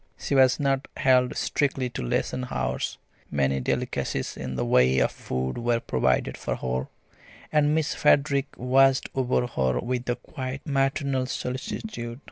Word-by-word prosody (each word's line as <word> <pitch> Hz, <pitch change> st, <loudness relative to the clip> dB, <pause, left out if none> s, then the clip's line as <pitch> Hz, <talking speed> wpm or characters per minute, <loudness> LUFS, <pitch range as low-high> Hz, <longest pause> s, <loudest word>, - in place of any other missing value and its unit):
She -, -, -3 dB
was 130 Hz, -1 st, +5 dB
not 135 Hz, -1 st, 0 dB
held 130 Hz, -2 st, +3 dB
strictly 135 Hz, -3 st, 0 dB
to -, -, -4 dB
lesson 125 Hz, -, -1 dB
hours; 65 Hz, 0 st, -2 dB, 0.3 s
many 70 Hz, -1 st, +1 dB
delicacies 65 Hz, -, -2 dB
in 65 Hz, -, -5 dB
the 65 Hz, -, -1 dB
way 65 Hz, +2 st, +4 dB
of 65 Hz, -, +3 dB
food 65 Hz, -, -3 dB
were 120 Hz, 0 st, +1 dB
provided 65 Hz, -, 0 dB
for -, -, -3 dB
her, 65 Hz, 0 st, -2 dB, 0.6 s
and 150 Hz, 0 st, +3 dB
Miss 160 Hz, -1 st, 0 dB
Frederick 140 Hz, -1 st, +3 dB
watched 135 Hz, +1 st, +3 dB
over 125 Hz, -1 st, +1 dB
her 65 Hz, -, 0 dB
with 125 Hz, -, -3 dB
a 120 Hz, -, +2 dB
quite 130 Hz, +1 st, -7 dB
maternal 135 Hz, -2 st, 0 dB
solicitude. 125 Hz, -, -5 dB
125 Hz, 145 wpm, -26 LUFS, -, 0.6 s, was